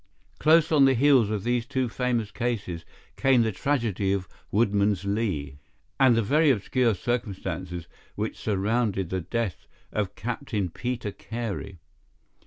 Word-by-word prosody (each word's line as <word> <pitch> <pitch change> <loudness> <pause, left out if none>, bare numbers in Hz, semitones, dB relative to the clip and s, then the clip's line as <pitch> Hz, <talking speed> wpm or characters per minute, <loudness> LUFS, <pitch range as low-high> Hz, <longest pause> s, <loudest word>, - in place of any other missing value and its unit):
Close 160 +1 +5
on 145 -3 +6
the 135 -1 +4
heels 130 -4 +5
of 105 -3 -2
these 120 0 0
two 130 -3 0
famous 120 -3 -1
cases 100 -9 -3 0.3
came 130 -3 +4
the 110 - 0
tragedy 110 -5 0
of 95 -2 -1 0.2
Woodman's 100 -3 +2
Lee, 90 -10 -2 0.4
and 130 -3 +6
the 115 - +2
very 150 +7 +3
obscure 120 -1 +2
circumstances 95 -6 -3 0.3
which 105 +1 -3
surrounded 105 -2 0
the 95 -1 -1
death 105 -1 -3 0.2
of 105 -2 -2
Captain 105 - -3
Peter 120 0 -3
Carey. 105 -4 -5
110 Hz, 135 wpm, -26 LUFS, 100-125 Hz, 0.4 s, on